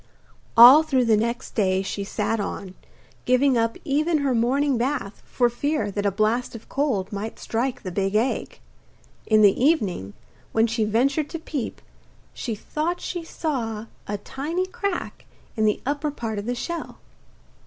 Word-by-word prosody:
All 250 +6 +11
through 265 -6 +1
the 225 -2 +4
next 235 +4 -2
day 190 -3 +1
she 200 +1 -4
sat 210 +2 -1
on, 195 -2 -5 0.5
giving 255 +2 +3
up 230 -1 +1
even 305 +4 +2
her 265 - +2
morning 265 +4 +2
bath 240 -4 -2
for 245 - +1
fear 285 0 -1
that 205 +1 -1
a - - +2
blast 220 +5 0
of 225 - -10
cold 230 -9 -1
might 210 +2 -5
strike 240 +3 -2
the 185 - -4
big 195 +2 -1
egg. 235 +5 0 0.7
In 215 -1 +5
the 205 +4 +4
evening, 200 - +1 0.4
when 225 0 +4
she 225 -1 0
ventured 275 +8 +1
to 330 - -4
peep, 295 -6 -5 0.5
she 230 -3 -4
thought 320 +10 -3
she 350 -2 -4
saw 235 -10 -3 0.2
a 205 - -2
tiny 305 - -3
crack 375 0 -4 0.3
in 220 -2 +1
the 210 - +2
upper 290 +2 -1
part 225 -7 -4
of 205 - -6
the 245 - -1
shell. 340 +7 -5
235 Hz, 165 wpm, -24 LUFS, 210-285 Hz, 0.7 s, All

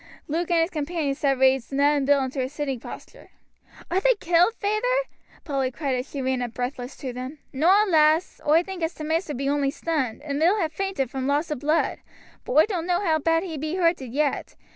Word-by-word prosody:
Luke 330 +3 -2
and 340 -1 +3
his 330 +3 0
companions 300 -2 -2
had 275 -2 +2
raised 265 -1 +3
Ned 285 +2 +3
and 275 -2 0
Bill 285 -1 +4
into 260 +1 -3
a 255 - -2
sitting 285 -3 -3
posture. - - -11 0.6
"Are 365 - +3
they - - +3
killed, 355 +3 +3
feyther?" - - 0 0.4
Polly 275 -4 -1
cried 275 +1 -3
as 255 +2 -3
she 275 -2 -4
ran 260 -1 0
up 240 -2 -4
breathless 250 +1 -4
to 255 -3 -5
them. 255 +4 -6 0.2
"Noa, 365 +10 +4
lass; 315 -1 +3
oi 320 +3 +5
think 380 -1 -7
as 325 +1 -2
t' 310 - -7
maister 315 -1 -1
be 275 +2 -2
only 285 -1 +1
stunned, 280 -5 -2
and 285 -1 -3
Bill 345 +6 +4
ha' 335 -7 -1
fainted 320 -8 -2
from 265 -1 -3
loss 295 +4 0
o' - - 0
blood. 305 +4 0 0.5
But - - -3
oi 305 +3 +6
doan't 360 -5 -3
know 355 +2 +1
how 315 -2 +2
bad 330 +2 +2
he 325 -6 -5
be 310 +4 -3
hurted 335 -9 +1
yet. 290 +2 -1
300 Hz, 220 wpm, -25 LUFS, 270-340 Hz, 0.6 s, oi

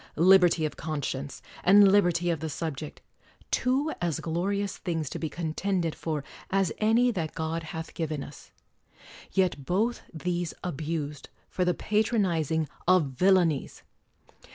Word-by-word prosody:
Liberty 175 -1 +5
of 155 - -3
conscience, 145 -3 -4 0.2
and 200 +1 +7
liberty 175 -3 +3
of 165 - -2
the 160 - -4
subject, 150 -1 -5 0.3
— - - -30
two 270 +5 +1
as 170 -4 -1
glorious 195 +5 -2
things 160 -6 -3
to - - -4
be 160 - -2
con 160 +1 -4
tended 180 -3 -1
for 155 -3 -3 0.3
as 195 -3 +1
any 230 +3 +4
that 165 -8 -4
God 160 +1 -2
hath 160 0 -7
given 155 -3 -3
us; 145 - -12 0.8
yet 180 -7 +1
both 215 - 0
these 175 0 -3
abused 150 -3 -4 0.2
for 185 - 0
the 180 -1 +1
patronizing 180 - +1 0.2
of 175 -6 +4
villain 180 +3 +4
ies 140 - -7
170 Hz, 145 wpm, -28 LUFS, 155-190 Hz, 0.8 s, and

